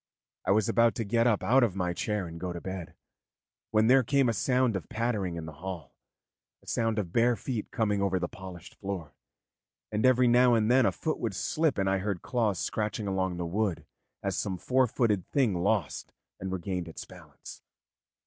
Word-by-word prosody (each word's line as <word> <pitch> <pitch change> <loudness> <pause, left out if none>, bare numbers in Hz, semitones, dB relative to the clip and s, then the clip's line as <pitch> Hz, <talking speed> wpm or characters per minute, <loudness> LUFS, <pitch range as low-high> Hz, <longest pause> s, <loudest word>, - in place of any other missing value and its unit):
I - - -2
was 105 +1 +3
about 115 -1 +3
to 115 - -2
get 115 +3 +2
up 110 -4 +2
out 130 +3 +4
of 105 -6 +1
my 90 -2 -1
chair 105 +1 -2
and 85 0 -8
go 90 0 -3
to 85 - -5
bed, 95 -1 -6 0.7
when 110 0 +3
there 130 +3 +6
came 135 +1 +2
a - - +1
sound 125 +1 +1
of 95 - -5
pattering 110 -6 -1
in 80 -1 -5
the 80 - -7
hall, 95 -3 -6 0.7
a - - -24
sound 115 -1 0
of 95 -5 -3
bare 120 +1 +4
feet 115 +1 -4
coming 105 -4 0
over 95 -1 +1
the 90 -1 -1
polished 95 -2 -10
floor, 95 -7 -6 0.8
and 105 0 -1
every 130 -1 +5
now 120 0 +5
and 110 0 +2
then 130 +1 +5
a - - +2
foot 160 - -3
would 110 -5 -2
slip 155 - 0
and 95 -1 +1
I 95 0 +2
heard 100 -2 -3
claws 110 -6 0
scratching 105 +3 -2
along 95 -2 -1
the 85 - -3
wood 95 +1 -1 0.4
as - - -1
some 95 -2 -2
four 130 +7 +2
footed 105 -6 0
thing 130 -8 +2
lost 100 -4 -1 0.3
and 95 0 -4
regained 90 -1 -3
its 80 - -8
balance. - - -13
105 Hz, 200 wpm, -29 LUFS, 95-120 Hz, 0.8 s, there